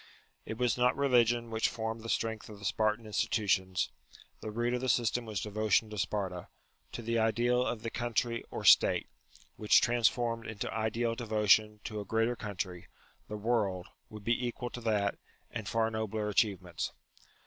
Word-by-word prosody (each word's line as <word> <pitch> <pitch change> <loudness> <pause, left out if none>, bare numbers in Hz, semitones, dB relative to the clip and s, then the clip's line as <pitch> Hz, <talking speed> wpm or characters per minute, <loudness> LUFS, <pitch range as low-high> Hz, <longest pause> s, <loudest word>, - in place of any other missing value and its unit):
It 110 - -4
was 125 -1 +1
not 125 +1 +3
religion 120 -4 +3
which 110 0 +1
formed 110 0 -4
the 115 - -7
strength 110 -1 -2
of 105 - -10
the 100 - -10
Spartan 110 +2 +1
institutions: 100 -4 0 0.5
the 110 - -6
root 120 +3 -1
of 125 - -1
the 130 - -1
system 120 0 +1
was 105 -3 -3
devotion 110 +1 +1
to 105 - -6
Sparta, 95 -2 -2 0.5
to 120 - -5
the 115 +1 0
ideal 120 +3 +2
of 115 -3 -3
the 115 - -3
country 120 0 -1
or - - -6
State: - - +6 0.5
which 105 - +5
transformed 120 -1 +1
into 110 -2 -4
ideal 115 +1 0
devotion 105 -2 +2
to 105 - -5
a 100 - -5
greater 115 +4 +1
country, 95 -5 -5 0.4
the 105 - -5
world, 105 -4 0 0.2
would 105 -1 -10
be 120 +3 +1
equal 120 0 -5
to 120 - -7
that 105 -3 0 0.3
and 105 -2 -5
far 115 0 +1
nobler 110 -1 -2
achievements. 95 -5 0
110 Hz, 170 wpm, -31 LUFS, 105-120 Hz, 0.5 s, State